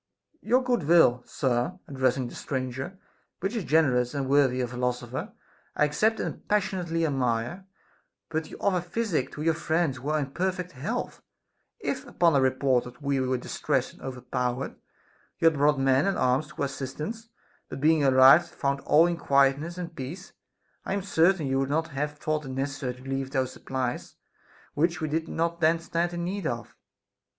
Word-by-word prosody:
Your 250 +4 +2
good 245 -9 0
will, 160 -8 +5
sir 125 +6 -1
(addressing 130 -3 0
the - - -10
stranger), 130 +6 -4 0.4
which 195 +6 -2
is 220 - -1
generous 135 -6 +2
and 140 -2 -1
worthy 135 -2 +3
a 125 - 0
philosopher, 125 0 -3 0.4
I 150 - +4
accept 215 +10 +1
and - - -5
passionately 180 -5 0
admire; 135 +5 -1 0.6
but 160 -1 -3
you - - -9
offer 185 -3 +1
physic 175 - -2
to 150 - -5
your 165 0 +3
friends 160 -3 0
who 135 +3 -5
are 155 - +2
in 140 -3 -3
perfect 185 +2 -2
health! 135 -4 -4 0.6
If, - - -3
upon 170 -3 +3
a 135 - +4
report 130 -1 +2
that 125 +3 -12
we 140 -1 +1
were 130 0 0
distressed 125 - -1
and - - -19
overpowered, 125 0 -3 0.6
you - - -1
had 165 - +5
brought 145 0 +3
men 135 +4 +3
and 195 - 0
arms 130 +4 +2
to - - -15
our - - +3
assistance, 150 - -5 0.4
but 130 - -6
being 155 +1 +4
arrived 135 +5 +7
had - - -21
found 140 -2 0
all 155 +3 +5
in 175 -1 0
quietness 140 +3 +2
and 175 -2 -6
peace, 165 +9 -7 0.5
I - - -3
am 200 - -2
certain 180 -3 +3
you 135 0 +1
would 135 0 0
not 160 +3 0
have 150 +1 -3
thought 155 0 -2
it - - -7
necessary 135 -1 -3
to 125 - -15
leave 135 0 -3
those 130 -2 -1
supplies 130 -2 -4 0.6
which 165 +2 +1
we 155 - -2
did 160 +2 -1
not 170 +1 -1
then 160 +1 +4
stand 170 +1 -1
in 175 0 -4
need 185 -1 -2
of. 120 0 -5
145 Hz, 180 wpm, -27 LUFS, 130-170 Hz, 0.6 s, arrived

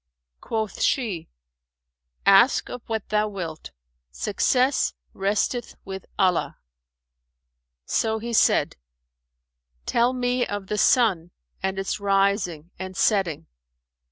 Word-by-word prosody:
Quoth 220 -2 -3
she, 215 - 0 1.0
"Ask 200 +7 +5
of 250 - -6
what 220 -2 -3
thou 215 0 +2
wilt; 170 -6 -6 0.4
success 250 - +1 0.2
resteth 205 +5 -1
with 190 -1 -7
Allah." 180 -3 +1 1.3
So 220 -1 0
he 235 +2 -5
said, - - +3 1.1
"Tell 240 +1 +2
me 250 0 0
of 205 -3 -4
the 210 +2 -3
sun 195 -9 +3 0.3
and 190 0 -2
its 195 +1 -2
rising 195 -5 0
and 190 0 -6
setting." 190 - +1
200 Hz, 100 wpm, -24 LUFS, 190-230 Hz, 1.3 s, Ask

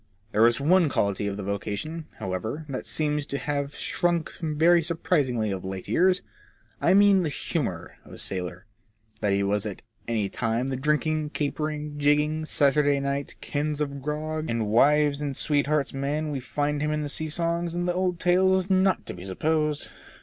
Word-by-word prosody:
There 110 +2 +5
is 120 +2 +1
one 165 +3 +4
quality 100 -4 0
of 100 0 -3
the 100 - -5
vocation, 105 - -4
however, 110 - -4
that 130 - -4
seems 150 -1 0
to - - -4
me - - 0
to - - -9
have 140 -1 -2
shrunk 170 -2 0
very 165 +2 +4
surprisingly 145 - 0
of 95 -2 -4
late 95 0 -5
years. 185 +1 +3 0.6
I - - +4
mean 200 -1 +6
the 165 - 0
humour 130 - -3
of - - -16
the - - -9
sailor. 90 0 -3 0.5
That 105 - +1
he 100 0 +1
was 100 +2 0
at 100 - -7 0.2
any 110 -3 0
time 115 +5 -1
the 135 - -1
drinking, 150 +2 0
capering, 150 0 -3
jigging, 150 +2 +2
Saturday 145 -1 +3
night, 140 0 -3
cans 150 0 -2
of 140 -2 -3
grog, 155 +2 -3
and 115 -1 0
wives 145 +5 +4
and 140 -2 -2
sweethearts' 145 0 +1
man 145 +3 -2
we 140 - -2
find 145 +3 -2
him 150 - 0
in 150 0 -1
the - - -2
sea 155 +2 -2
songs 170 +1 -1
and 175 0 -1
the 175 - +1
old 180 -1 0
tales 190 +1 +3
is 185 - -14
not 190 0 +3
to - - -6
be 90 +1 -9
supposed. 150 +8 0
150 Hz, 185 wpm, -26 LUFS, 120-155 Hz, 0.6 s, mean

